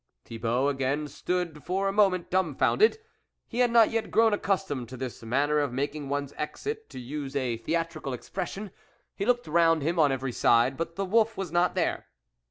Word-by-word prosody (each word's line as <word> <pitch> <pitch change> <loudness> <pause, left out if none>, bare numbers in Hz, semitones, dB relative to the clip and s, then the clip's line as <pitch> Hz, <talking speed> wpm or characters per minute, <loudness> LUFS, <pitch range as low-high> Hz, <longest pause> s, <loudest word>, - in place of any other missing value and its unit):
Thibault 120 +4 0
again 140 +2 -1
stood 165 +1 -3
for 195 +2 -1
a - - +1
moment 195 -4 +2
dumbfounded. 185 - +3 0.5
He 240 - -5
had 245 -1 +4
not 230 -1 +5
yet 225 -1 -1
grown 225 -1 +4
accustomed 190 - -1
to 130 - -8
this 130 -1 -6
manner 140 +6 +1
of 145 -3 0
making 140 +2 -3
one's 140 0 -2
exit, 435 - -5
to - - -8
use 135 +2 -6
a 125 -4 -1
theatrical 160 +2 -3
expression; 195 - -5 0.4
he 200 - -3
looked 245 0 +2
round 165 -1 +3
him 170 +3 0
on 145 -3 +5
every 135 -1 -2
side, 120 +3 +3
but 165 +2 -4
the 195 - -2
wolf 225 +3 +2
was 190 -4 -4
not 175 +1 +2
there. - - -1
155 Hz, 180 wpm, -27 LUFS, 135-195 Hz, 0.5 s, not